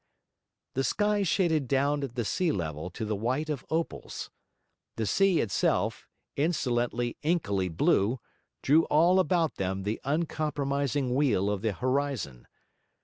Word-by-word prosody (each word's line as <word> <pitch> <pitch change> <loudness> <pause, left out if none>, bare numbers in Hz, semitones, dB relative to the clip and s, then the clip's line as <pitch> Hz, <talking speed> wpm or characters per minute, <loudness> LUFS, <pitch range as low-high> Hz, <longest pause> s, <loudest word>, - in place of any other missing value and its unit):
The 135 - 0
sky 205 +10 +1
shaded 165 -6 +1
down 140 +2 +1
at 125 -3 -5
the 120 -3 -1
sea 175 - +1
level 80 - -3
to 110 +5 -5
the 105 0 -1
white 130 +9 -1
of 140 -4 -4
opals; 165 +1 -3 0.6
the 110 - -2
sea 190 - +3
itself, 100 -4 0 0.3
insolently, 120 -6 0
inkily 105 - 0
blue, 100 +8 +2 0.4
drew 155 +4 +5
all 175 +5 +4
about 175 -4 +1
them 95 0 -2
the 105 +3 -3
uncompromising 140 -3 -1
wheel 110 -8 +2
of 100 -2 -2
the 110 -2 0
horizon. 130 - -2
135 Hz, 135 wpm, -28 LUFS, 110-155 Hz, 0.6 s, drew